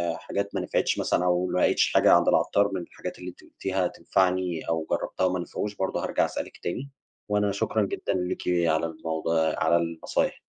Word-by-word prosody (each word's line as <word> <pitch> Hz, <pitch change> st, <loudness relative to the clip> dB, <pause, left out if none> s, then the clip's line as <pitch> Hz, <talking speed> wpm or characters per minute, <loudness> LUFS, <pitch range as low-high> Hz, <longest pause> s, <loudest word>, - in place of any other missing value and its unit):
حاجات -, -, -4 dB
ما -, -, 0 dB
نفعتش -, -, 0 dB
مثلًا 90 Hz, -, +1 dB
أو 90 Hz, 0 st, +2 dB
ما 90 Hz, -, 0 dB
لقيتش -, -, +3 dB
حاجة -, -, +5 dB
عند -, -, +5 dB
العطّار 100 Hz, 0 st, +3 dB
من 95 Hz, -, -2 dB
الحاجات 85 Hz, -, -8 dB
اللي 90 Hz, -, -6 dB
أنتِ 90 Hz, -, -15 dB
قُلتيها 95 Hz, -2 st, -2 dB
تنفعني 90 Hz, -3 st, 0 dB
أو 80 Hz, -1 st, -1 dB
جربتها 95 Hz, -, 0 dB
وما 90 Hz, 0 st, +1 dB
نفعوش، 105 Hz, +4 st, -4 dB
برضو 95 Hz, -1 st, -1 dB
هارجع -, -, +1 dB
أسألِك -, -, -5 dB
تاني، 130 Hz, +11 st, -3 dB, 0.4 s
وأنا 105 Hz, -1 st, +2 dB
شكرًا 100 Hz, +2 st, 0 dB
جدًا 100 Hz, -, -2 dB
ليكِ 90 Hz, -1 st, -2 dB, 0.2 s
على 80 Hz, +1 st, +2 dB
الموضوع 80 Hz, 0 st, -1 dB
على 85 Hz, -, +4 dB
النصايح. 85 Hz, -1 st, -1 dB
90 Hz, 180 wpm, -26 LUFS, 85-95 Hz, 0.4 s, حاجة